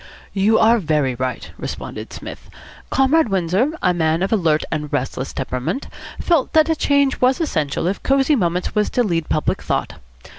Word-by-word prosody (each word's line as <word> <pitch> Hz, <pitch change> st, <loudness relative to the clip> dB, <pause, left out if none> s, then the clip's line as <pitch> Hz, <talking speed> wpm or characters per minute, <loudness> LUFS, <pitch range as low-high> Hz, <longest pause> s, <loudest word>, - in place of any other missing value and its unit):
"You 210 Hz, +3 st, +3 dB
are 230 Hz, +1 st, +5 dB
very 150 Hz, -7 st, 0 dB
right," 130 Hz, +1 st, -4 dB
responded -, -, -6 dB
Psmith. -, -, -9 dB, 0.4 s
"Comrade 270 Hz, +1 st, +3 dB
Windsor, 195 Hz, -, +1 dB
a 180 Hz, -, +3 dB
man 160 Hz, 0 st, +1 dB
of 195 Hz, -, 0 dB
alert 160 Hz, -7 st, +2 dB
and 150 Hz, -2 st, -3 dB
restless 130 Hz, +1 st, -2 dB
temperament, 130 Hz, -, -3 dB, 0.3 s
felt 335 Hz, -6 st, +1 dB
that 315 Hz, 0 st, +4 dB
a 320 Hz, -, +2 dB
change 280 Hz, -3 st, +1 dB
was 255 Hz, +1 st, +3 dB
essential 155 Hz, -, -1 dB
if 190 Hz, +3 st, -1 dB
Cosy 275 Hz, +2 st, +3 dB
Moments 180 Hz, -5 st, -1 dB
was 210 Hz, -1 st, +1 dB
to 245 Hz, -, +1 dB
lead 170 Hz, -7 st, -1 dB
public 155 Hz, -, 0 dB
thought. -, -, -2 dB
190 Hz, 170 wpm, -20 LUFS, -, 0.4 s, are